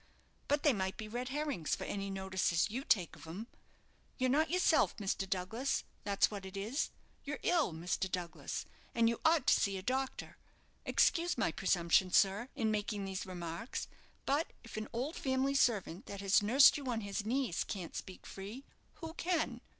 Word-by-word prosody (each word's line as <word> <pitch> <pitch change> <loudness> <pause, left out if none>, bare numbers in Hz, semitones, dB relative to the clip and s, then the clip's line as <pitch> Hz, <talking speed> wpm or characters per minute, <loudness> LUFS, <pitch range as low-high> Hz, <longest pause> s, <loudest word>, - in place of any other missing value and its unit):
But 290 0 +1
they 290 - +5
might 190 -2 -2
be 215 - -6
red 245 +4 -4
herrings 285 - -1
for - - -6
any 200 0 -3
notice 190 -1 0
as 170 +5 +2
you 260 +4 -3
take 180 - +2
of 155 0 -13
'em. 185 +8 -6 0.7
You're 255 -1 +2
not 310 +4 +3
yourself, 360 -2 +3
Mr. 195 -1 -2
Douglas, 220 +9 -1 0.2
that's 200 0 +3
what 200 -2 -5
it 190 +1 -7
is. 225 +9 -1 0.3
You're 295 +1 -4
ill, 335 - +3
Mr. 175 +3 -2
Douglas, 175 -2 -4 0.3
and 230 -1 +4
you 230 0 0
ought 320 -4 +4
to 285 - +6
see 195 -1 +1
a 185 - -6
doctor. 260 +4 -2 0.5
Excuse 345 -2 +3
my 225 - +1
presumption, 180 -1 +2
sir, 200 +7 +3
in 225 -5 +1
making 210 -1 -2
these 190 0 -4
remarks; 175 +5 -5 0.4
but 290 +4 +1 0.2
if 230 - -10
an 215 0 -3
old 260 +7 -2
family 265 -2 +1
servant 210 -9 +1
that 200 -1 -6
has 195 0 +4
nursed 255 +9 +7
you 280 -2 -6
on 230 -2 -1
his 200 0 -3
knees 240 -4 0
can't 185 -5 -6
speak 185 - -7
free, 205 +7 -8 0.4
who 325 -1 -5
can?" 345 -1 -1
215 Hz, 180 wpm, -34 LUFS, 190-270 Hz, 0.7 s, nursed